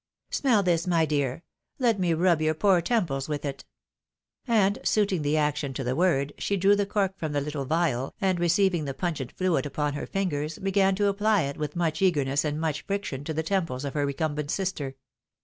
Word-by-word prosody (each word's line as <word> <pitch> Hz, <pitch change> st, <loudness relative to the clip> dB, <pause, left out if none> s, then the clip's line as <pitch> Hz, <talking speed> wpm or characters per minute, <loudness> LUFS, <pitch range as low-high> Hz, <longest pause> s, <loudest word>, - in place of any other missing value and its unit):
Smell 235 Hz, -7 st, +2 dB
this, 170 Hz, -1 st, +1 dB
my 165 Hz, -2 st, +3 dB
dear; 145 Hz, 0 st, -1 dB, 0.3 s
let 235 Hz, -6 st, +2 dB
me 180 Hz, -2 st, +1 dB
rub 170 Hz, -1 st, +3 dB
your 155 Hz, 0 st, +1 dB
poor 185 Hz, +1 st, +3 dB
temples 165 Hz, -, -1 dB
with 150 Hz, -1 st, -3 dB
it! 140 Hz, -1 st, -5 dB, 0.4 s
" -, -, -57 dB
And 205 Hz, -4 st, +3 dB
suiting 200 Hz, -5 st, +1 dB
the 145 Hz, +1 st, +1 dB
action 150 Hz, -2 st, 0 dB
to 135 Hz, -, -3 dB
the 125 Hz, +1 st, -1 dB
word, 145 Hz, -5 st, +1 dB
she 200 Hz, -, 0 dB
drew 195 Hz, +2 st, +4 dB
the 205 Hz, -1 st, 0 dB
cork 195 Hz, -2 st, -1 dB
from 155 Hz, -2 st, -3 dB
the 145 Hz, -, +1 dB
little 145 Hz, -1 st, -4 dB
phial, 155 Hz, -5 st, 0 dB
and 190 Hz, -4 st, +1 dB
receiving 175 Hz, -1 st, +2 dB
the 135 Hz, -1 st, -4 dB
pungent 155 Hz, -8 st, -3 dB
fluid 185 Hz, -5 st, 0 dB
upon 145 Hz, +1 st, -2 dB
her 145 Hz, -, -5 dB
fingers 155 Hz, -5 st, -2 dB
began 195 Hz, 0 st, +2 dB
to 205 Hz, +1 st, +1 dB
apply 205 Hz, -1 st, +2 dB
it 140 Hz, 0 st, -4 dB
with 150 Hz, -1 st, -4 dB
much 165 Hz, -2 st, -1 dB
eagerness 145 Hz, -6 st, +2 dB
and 150 Hz, 0 st, -2 dB
much 155 Hz, -2 st, -1 dB
friction 195 Hz, -9 st, -4 dB
to 160 Hz, -, -3 dB
the 160 Hz, -, -1 dB
temples 160 Hz, -7 st, -1 dB
of 140 Hz, -, -4 dB
her 145 Hz, -1 st, 0 dB
recumbent 150 Hz, +1 st, -2 dB
sister. 155 Hz, -9 st, -2 dB
160 Hz, 205 wpm, -27 LUFS, 145-190 Hz, 0.4 s, drew